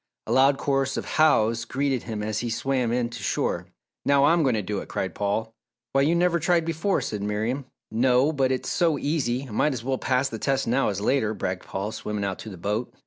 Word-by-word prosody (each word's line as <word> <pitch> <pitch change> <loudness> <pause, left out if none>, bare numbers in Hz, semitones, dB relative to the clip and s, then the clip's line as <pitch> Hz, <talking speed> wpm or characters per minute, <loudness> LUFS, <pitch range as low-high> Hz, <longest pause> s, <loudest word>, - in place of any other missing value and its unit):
A - - -5
loud 135 +1 +5
chorus 135 -1 0
of - - -3
"Hows" 115 -7 +3
greeted 135 +1 -1
him 110 -2 -5
as 110 0 -2
he 120 - -2
swam 125 0 0
in 120 -1 0
to 115 -2 -8
shore. - - -1 0.4
"Now 140 0 +4
I'm 165 +4 +4
going 130 -6 +2
to 105 - -1
do 100 +1 -2
it!" - - -9
cried 95 - -3
Paul. 105 +2 -2 0.4
"Why 135 - +4
you 155 +5 +3
never 170 0 +2
tried 170 0 +2
before," 165 +4 0
said 105 -2 -4
Miriam. 110 +6 -2 0.3
"No, 125 +5 +3
but 135 -3 +1
it's 130 - -2
so 165 -4 +2
easy! 135 -4 -1
I - - -11
might 145 +7 +1
as 120 -3 -5
well 130 +1 -1
pass 130 +1 +1
the 115 -4 -6
test 135 +2 0
now 125 +2 +2
as 100 -1 -3
later," 110 -2 +1
bragged 95 -1 -3
Paul, 100 +3 -3
swimming 105 -2 -3
out 95 -1 -3
to 110 - -7
the 95 - -9
boat. 105 +7 -2
125 Hz, 230 wpm, -25 LUFS, 110-140 Hz, 0.4 s, loud